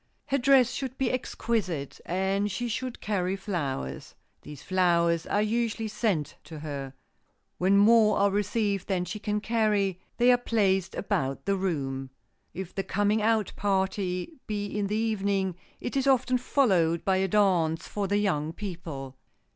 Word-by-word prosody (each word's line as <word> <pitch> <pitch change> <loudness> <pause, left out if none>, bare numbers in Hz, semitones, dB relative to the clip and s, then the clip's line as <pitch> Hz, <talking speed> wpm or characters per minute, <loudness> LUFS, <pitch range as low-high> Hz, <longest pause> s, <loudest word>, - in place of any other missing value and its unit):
Her 275 - 0
dress 260 -1 +5
should 260 0 -4
be 265 -2 +1
exquisite, 205 - -2
and 195 +3 0
she 240 +6 -2
should 255 +2 -4
carry 190 -3 -1
flowers. 145 - -4 0.3
These 150 -2 -10
flowers 170 -3 +2
are 205 - +1
usually 225 0 -1
sent 210 -8 -1
to 155 +1 -9
her. 140 -3 -6 0.6
When 190 +2 +4
more 215 +1 +5
are 200 0 +3
received 205 -1 0
than 185 -2 0
she 195 +5 -5
can 210 0 -1
carry, 210 -4 +1 0.2
they 245 +1 +5
are 245 - +5
placed 195 -6 +1
about 135 -8 -2
the 200 0 +2
room. 135 -8 -2 0.4
If 185 -1 -7
the 195 - -2
coming 205 +3 +1
out 220 -1 +1
party 190 - -1
be 205 -2 -2
in 205 0 -2
the 210 - -1
evening, 200 -4 0 0.2
it - - -5
is 270 0 +1
often 255 -1 +3
followed 185 - +2
by 190 -1 +3
a 190 0 +1
dance 180 -5 +2
for 205 -1 -2
the 205 +1 +1
young 165 -7 0
people. 165 -9 -6
200 Hz, 155 wpm, -28 LUFS, 175-215 Hz, 0.6 s, dress